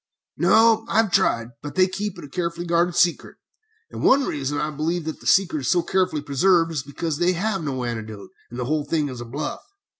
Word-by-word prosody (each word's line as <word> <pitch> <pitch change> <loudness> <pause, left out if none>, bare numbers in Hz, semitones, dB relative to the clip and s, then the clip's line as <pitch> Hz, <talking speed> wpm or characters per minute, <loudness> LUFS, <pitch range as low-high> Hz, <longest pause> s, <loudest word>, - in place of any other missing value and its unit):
"No, 225 0 +4
I - - 0
have 220 -4 +3
tried, 115 -12 +2
but 145 0 -8
they 185 -1 +5
keep 200 +1 -4
it - - -9
a - - -8
carefully 170 +2 -3
guarded 170 +1 +1
secret. 175 -1 +1 0.6
One 275 +1 +3
reason 145 0 -3
why 150 - -1
I - - -5
believe 160 +3 -2
that 160 - -5
the - - -9
secret 190 -5 +3
is 130 - -2
so 175 -1 +3
carefully 185 -6 0
preserved 165 +4 +2
is 155 -4 -2
because 145 +2 -4
they 180 +1 +3
have 195 +2 -1
no 130 -4 -3
antidote, 110 -3 -6 0.2
and 120 - -8
the 125 - -2
whole 150 +3 0
thing 150 -3 -1
is 125 -2 -7
a - - -6
bluff. 140 +6 -5
165 Hz, 220 wpm, -23 LUFS, 140-185 Hz, 0.6 s, they